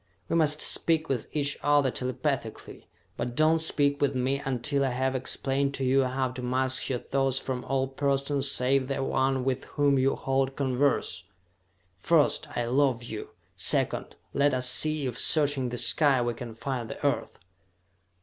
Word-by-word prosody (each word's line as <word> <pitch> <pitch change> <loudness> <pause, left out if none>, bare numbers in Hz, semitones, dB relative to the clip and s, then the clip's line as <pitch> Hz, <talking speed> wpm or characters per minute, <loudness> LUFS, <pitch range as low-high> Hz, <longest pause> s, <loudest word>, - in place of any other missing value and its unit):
"We - - 0
must 155 -2 +2
speak 160 -1 +1
with 125 -5 -2
each 145 -1 0
other 145 -3 +3
telepathically, 130 -2 -4 0.3
but 120 0 -4
do 155 +2 +4
not 165 0 +1
speak 145 -3 +3
with 140 -1 +1
me 130 +2 -1
until 135 +2 -1
I 135 - +1
have 130 +1 -1
explained 135 +1 -1
to 135 - -2
you 135 +1 +3
how 130 0 -1
to 125 +1 -8
mask 130 +1 0
your 130 - 0
thoughts 135 +1 -1
from 130 -2 -4
all 135 -1 0
persons 140 0 0
save 130 +1 +1
the 135 0 -2
one 135 -1 0
with 130 0 -2
whom 140 -2 +1
you 135 +1 +2
hold 135 0 -1
converse! 140 +1 0 0.7
First, 150 - +2
I 120 - 0
love 130 -1 +1
you! 110 -2 -7 0.3
Second, - - 0 0.2
let 140 -1 +2
us 125 0 +3
see 155 +2 +1
if, 125 -2 -3
searching 145 -4 +2
the 120 - -5
sky, 140 0 +3
we 120 0 -1
can 115 -1 -8
find 120 -1 -4
the - - -7
Earth!" - - -1
135 Hz, 170 wpm, -27 LUFS, 130-140 Hz, 0.7 s, do